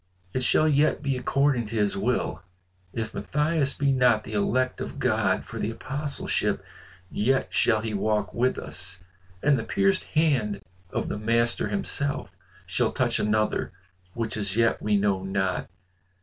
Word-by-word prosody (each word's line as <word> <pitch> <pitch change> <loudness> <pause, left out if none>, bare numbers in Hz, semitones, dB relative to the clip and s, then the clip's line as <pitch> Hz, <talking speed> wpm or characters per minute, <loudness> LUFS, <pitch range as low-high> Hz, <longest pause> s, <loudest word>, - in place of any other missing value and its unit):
"It 130 - 0
shall 155 +5 +4
yet 150 0 +3
be 140 -2 0
according 130 -2 +1
to 115 - -6
his 105 -2 +1
will. 115 +6 -1 0.5
If 110 +1 -4
Matthias 150 -1 0
be 140 -1 +2
not 125 -4 +4
the 110 - -8
elect 125 +5 +1
of - - -5
God - - +1
for - - -7
the 105 - -1
Apostleship, 140 +5 -2 0.5
yet 130 +6 +1
shall 110 -2 +3
he 110 -1 -3
walk 105 -1 0
with 125 +2 +1
us, 90 0 -6 0.4
and 140 -2 +4
the - - -3
pierced 195 - +1
hand 130 -11 +1 0.3
of - - -2
the - - -3
Master 115 +2 +1
himself 140 -8 -2 0.3
shall - - 0
touch - - 0
another 105 -2 0 0.4
which 110 -2 -2
as 100 -1 -2
yet 115 0 +3
we 105 -1 +2
know 100 -2 +1
not. 95 -1 -1
115 Hz, 155 wpm, -26 LUFS, 105-140 Hz, 0.5 s, shall